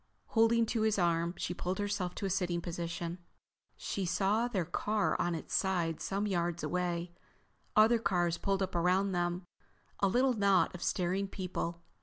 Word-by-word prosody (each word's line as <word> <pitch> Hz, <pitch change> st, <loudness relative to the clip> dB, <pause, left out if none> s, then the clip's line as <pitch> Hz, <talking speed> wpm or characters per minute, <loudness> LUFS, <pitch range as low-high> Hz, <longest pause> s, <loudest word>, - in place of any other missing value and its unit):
Holding 225 Hz, 0 st, +4 dB
to 225 Hz, 0 st, -1 dB
his 220 Hz, -1 st, +2 dB
arm 170 Hz, -1 st, +1 dB
she -, -, -2 dB
pulled 180 Hz, +1 st, -3 dB
herself 200 Hz, -3 st, -2 dB
to -, -, -4 dB
a -, -, 0 dB
sitting 180 Hz, -2 st, 0 dB
position. 170 Hz, 0 st, -4 dB, 0.6 s
She 195 Hz, -, -3 dB
saw 195 Hz, +6 st, +1 dB
their 195 Hz, -8 st, -1 dB
car 210 Hz, +5 st, 0 dB
on 175 Hz, -1 st, 0 dB
its 160 Hz, -, -7 dB
side 175 Hz, -4 st, 0 dB
some 200 Hz, +2 st, -1 dB
yards 175 Hz, -3 st, -1 dB
away, 175 Hz, -1 st, -1 dB, 0.6 s
other 225 Hz, +2 st, +6 dB
cars 175 Hz, -5 st, +1 dB
pulled 195 Hz, 0 st, 0 dB
up 190 Hz, -, -4 dB
around 180 Hz, +3 st, +2 dB
them, 175 Hz, 0 st, -1 dB, 0.6 s
a 200 Hz, -, +3 dB
little 255 Hz, +6 st, +3 dB
knot 200 Hz, -4 st, +3 dB
of 180 Hz, -, -8 dB
staring 185 Hz, +3 st, 0 dB
people. 175 Hz, -3 st, -4 dB
185 Hz, 165 wpm, -32 LUFS, 175-200 Hz, 0.6 s, other